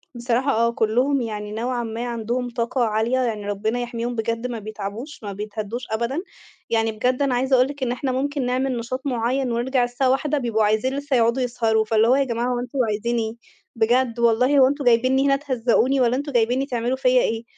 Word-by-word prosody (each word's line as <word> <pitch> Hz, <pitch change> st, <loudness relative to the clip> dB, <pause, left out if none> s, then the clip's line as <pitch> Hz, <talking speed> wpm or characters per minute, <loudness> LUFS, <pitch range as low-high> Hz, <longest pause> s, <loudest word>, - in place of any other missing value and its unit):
بصراحة 240 Hz, +3 st, 0 dB
آه، 235 Hz, 0 st, +2 dB
كُلّهم 250 Hz, +5 st, +1 dB
يعني 210 Hz, -2 st, -5 dB
نوعًا 240 Hz, +3 st, -2 dB
ما، 230 Hz, +1 st, -4 dB
عندهم 240 Hz, +1 st, -2 dB
طاقة 240 Hz, +2 st, -1 dB
عالية 220 Hz, +3 st, +1 dB
يعني 220 Hz, -5 st, -2 dB
ربّنا 215 Hz, +4 st, -1 dB
يحميهم 240 Hz, 0 st, -3 dB
بجد 230 Hz, +2 st, -2 dB
ما 235 Hz, -2 st, -5 dB
بيتعبوش، 215 Hz, +6 st, -7 dB
ما 200 Hz, -1 st, -5 dB
بيتهدّوش 210 Hz, +3 st, -5 dB
أبدًا. 235 Hz, +9 st, -1 dB, 0.5 s
يعني 225 Hz, -1 st, +1 dB
بجد 250 Hz, +5 st, 0 dB
أنا 270 Hz, -3 st, +2 dB
عايزة 260 Hz, +2 st, +2 dB
أقول 255 Hz, +1 st, +4 dB
لِك 280 Hz, -1 st, -6 dB
إن 245 Hz, -, 0 dB
إحنا 255 Hz, +1 st, -2 dB
مُمكن 275 Hz, +1 st, -1 dB
نعمل 255 Hz, 0 st, 0 dB
نشاط 235 Hz, +3 st, -4 dB
مُعيّن 250 Hz, +1 st, 0 dB
ونرجع 245 Hz, +2 st, +1 dB
الساعة 245 Hz, +2 st, 0 dB
01:00 295 Hz, +3 st, +1 dB
بيبقوا 230 Hz, -5 st, 0 dB
عايزين 220 Hz, +6 st, +1 dB
لسّه 285 Hz, -1 st, -1 dB
يقعدوا 235 Hz, +2 st, +2 dB
يسهروا. 225 Hz, -3 st, +1 dB
فاللي 220 Hz, +1 st, +3 dB
هو 250 Hz, -, +5 dB
يا 275 Hz, -, +3 dB
جماعة 240 Hz, -2 st, -2 dB
هو 245 Hz, -, -1 dB
أنتم 250 Hz, +2 st, -5 dB
عايزين 230 Hz, +3 st, -1 dB
إيه؟ 220 Hz, -1 st, -2 dB, 0.4 s
بجد، 235 Hz, +1 st, +1 dB
والله 250 Hz, +5 st, +3 dB
هو 260 Hz, -, +7 dB
أنتم 285 Hz, 0 st, -2 dB
جايبينّي 255 Hz, +3 st, +3 dB
هنا 275 Hz, -, +4 dB
تهَزّقوني 260 Hz, -1 st, +1 dB
والّا 245 Hz, 0 st, +3 dB
أنتم 285 Hz, +2 st, -3 dB
جايبينّي 245 Hz, +2 st, +1 dB
تعملوا 245 Hz, 0 st, -2 dB
فيَّ 265 Hz, -1 st, 0 dB
إيه؟ 225 Hz, 0 st, -1 dB
240 Hz, 200 wpm, -22 LUFS, 225-260 Hz, 0.5 s, هو